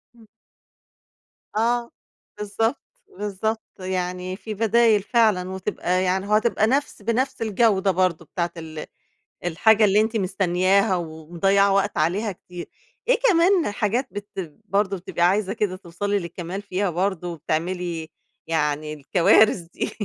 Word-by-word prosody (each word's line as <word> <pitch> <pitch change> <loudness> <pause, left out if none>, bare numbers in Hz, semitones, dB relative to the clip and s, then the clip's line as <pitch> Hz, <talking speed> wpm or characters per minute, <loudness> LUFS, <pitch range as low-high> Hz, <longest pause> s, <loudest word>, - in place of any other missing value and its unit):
إمم. 230 -2 -18 1.3
آه. 235 +2 +1 0.5
بالضبط، 225 +5 -1 0.4
بالضبط، 210 +2 -2 0.2
يعني 185 0 -3
في 215 +2 -7
بدايل 225 0 +3
فعلًا 210 -6 +2
وتبقى 185 -1 -1
يعني 190 +1 0
وهتبقى 215 +1 +2
نفس 275 -1 -1
بنفس 235 +6 -1
الجودة 210 -3 +2
برضه 180 -2 0
بتاعة 170 0 -3
ال 160 -1 -7 0.6
الحاجة 215 +6 +4
اللي 205 0 +4
أنتِ 220 +1 0
مستنياها 190 0 +2
ومضيعة 175 +4 +1
وقت 200 0 +1
عليها 190 +7 0
كتير. 175 -1 -10 0.4
إيه - - +4
كمان 350 - +4
حاجات 225 +5 -1
بت 205 0 -7 0.4
برضه 200 -1 0
بتبقى 175 -1 -4
عايزة 195 +1 +1
كده 205 -4 -1
توصَلي 200 +3 -2
للكمال 175 +2 -6
فيها 200 -1 -1
برضه، 180 0 -1
وبتعملي 165 +1 -3 0.4
يعني 150 -1 -1
الكوارث 175 +8 +4
دي؟ 170 0 -5
195 Hz, 125 wpm, -23 LUFS, 175-215 Hz, 1.3 s, الحاجة